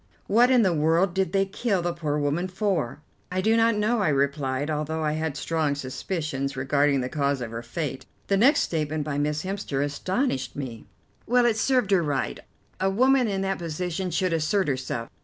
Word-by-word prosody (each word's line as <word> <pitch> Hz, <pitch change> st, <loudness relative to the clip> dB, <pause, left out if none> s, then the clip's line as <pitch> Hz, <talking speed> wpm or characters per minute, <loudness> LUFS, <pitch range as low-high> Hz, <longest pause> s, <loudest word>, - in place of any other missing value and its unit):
What 235 Hz, +4 st, +4 dB
in 250 Hz, -3 st, +5 dB
the 185 Hz, -3 st, +3 dB
world 165 Hz, +4 st, +2 dB
did 190 Hz, 0 st, 0 dB
they 195 Hz, -1 st, +2 dB
kill 195 Hz, -1 st, -1 dB
the 175 Hz, 0 st, -1 dB
poor 155 Hz, -3 st, -2 dB
woman 150 Hz, +5 st, 0 dB
for?" 185 Hz, -, -2 dB, 0.3 s
"I 185 Hz, -, -1 dB
do 220 Hz, +4 st, +3 dB
not 230 Hz, 0 st, +4 dB
know," 215 Hz, +3 st, +1 dB
I 195 Hz, -, +2 dB
replied, 140 Hz, -1 st, 0 dB
although 155 Hz, +1 st, -2 dB
I 150 Hz, -, +1 dB
had 155 Hz, -2 st, -2 dB
strong 155 Hz, -2 st, 0 dB
suspicions 140 Hz, 0 st, -3 dB
regarding 140 Hz, +1 st, +2 dB
the 125 Hz, -, -2 dB
cause 140 Hz, 0 st, 0 dB
of 120 Hz, -2 st, -5 dB
her 115 Hz, 0 st, -5 dB
fate. 135 Hz, +2 st, -5 dB, 0.2 s
The 200 Hz, -, +1 dB
next 270 Hz, +9 st, +5 dB
statement 155 Hz, -2 st, -1 dB
by 145 Hz, -1 st, -2 dB
Miss 150 Hz, +1 st, -1 dB
Hemster 185 Hz, -8 st, -2 dB
astonished 145 Hz, -, -2 dB
me. 125 Hz, -6 st, -6 dB, 0.4 s
"Well, 245 Hz, +1 st, +4 dB
it 235 Hz, -2 st, +3 dB
served 245 Hz, -2 st, +1 dB
her 190 Hz, -3 st, +5 dB
right. 145 Hz, -4 st, -2 dB, 0.4 s
A 190 Hz, -, +2 dB
woman 255 Hz, +5 st, +3 dB
in 195 Hz, -2 st, -1 dB
that 195 Hz, 0 st, -1 dB
position 175 Hz, +2 st, -3 dB
should 180 Hz, +1 st, 0 dB
assert 165 Hz, +4 st, +1 dB
herself. 130 Hz, -4 st, -2 dB
160 Hz, 195 wpm, -25 LUFS, 145-195 Hz, 0.4 s, in